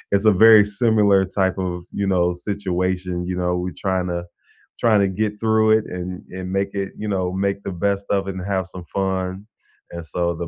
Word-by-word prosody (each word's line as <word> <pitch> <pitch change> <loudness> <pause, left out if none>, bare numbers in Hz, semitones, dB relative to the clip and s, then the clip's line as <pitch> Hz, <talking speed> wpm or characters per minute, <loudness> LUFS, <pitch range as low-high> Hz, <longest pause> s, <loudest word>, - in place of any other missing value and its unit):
it's 100 +2 0
a 110 - +7
very 110 -2 +9 0.2
similar 105 -4 +4 0.2
type 95 -1 +2
of, 90 - -3 0.2
you 100 - 0
know, 90 -1 +3 0.2
situation, 95 -2 -1
you 90 - -2
know, 90 0 0
we 90 - -3
trying 95 -2 0
to 85 - -2 0.6
trying 110 -3 +5
to - - 0
get 105 -1 +1
through 110 -1 +3
it 110 - -2
and 90 +1 -4 0.3
and 90 0 -5
make 100 0 0
it 95 - -4
you - - -2
know, 95 -1 0 0.2
make 100 0 0
the - - -4
best 100 0 0
of 100 - +2
it 95 - -5
and 95 -1 -5
have 95 -1 0
some 90 -2 -8
fun, 95 +1 -2 0.5
and 85 -1 -6
so, 90 - 0
the 85 +1 -5
95 Hz, 210 wpm, -21 LUFS, 90-100 Hz, 0.6 s, very